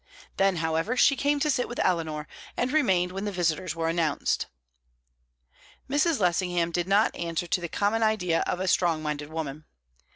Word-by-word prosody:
Then, 195 -1 +3
however, 165 +8 -1
she 275 - +5
came 285 +1 +1
to 300 - +2
sit 250 - -1
with 240 - -6
Eleanor, 155 -4 -1 0.3
and 250 +1 0
remained 190 - +2
when 195 +2 -4
the 205 - -2
visitors 175 -1 -1
were 165 0 -1
announced. 165 -3 0 1.4
Mrs. 295 +1 +1
Lessingham 175 -2 +1
did 175 +1 -1
not 205 +3 +3
answer 170 0 -3
to 175 - -1
the 170 - -4
common 205 +5 0
idea 195 -7 +2
of 180 - -1
a 190 - -2
strong 170 -4 +2
minded 150 -1 -3
woman. 155 -2 -5
180 Hz, 170 wpm, -27 LUFS, 165-215 Hz, 1.4 s, she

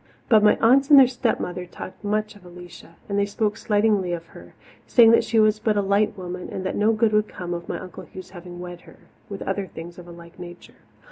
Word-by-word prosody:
But 220 -4 +6
my 210 - +4
aunts 270 +5 +4
and 290 - +8
their 265 - +8
stepmother 225 -8 -3
talked 185 - -10
much 215 +1 -2
of 205 - -18
Alicia, 175 -1 -13
and 200 0 -1
they 200 - +2
spoke 210 +1 -1
slightingly 205 -4 +1
of 165 -1 -5
her, - - -15 0.3
saying 230 -2 +6
that 230 - +4
she 225 0 +1
was 215 0 +3
but 215 -2 0
a 205 - +1
light 200 +2 +1
woman 180 0 -7
and 190 - -6
that 185 - -2
no 210 +2 +2
good 220 0 +1
would 210 0 +2
come 175 -1 -6
of 170 0 -7
my - - -3
Uncle 185 - -10
Hugh's 185 -1 -11
having 175 -1 -11
wed 175 -1 -9
her, - - -17 0.3
with 200 -1 -6
other 195 0 -3
things 170 +1 -10
of 175 - -12
a - - -11
like 170 +1 -14
nature. 175 0 -13
200 Hz, 235 wpm, -23 LUFS, 180-215 Hz, 0.3 s, and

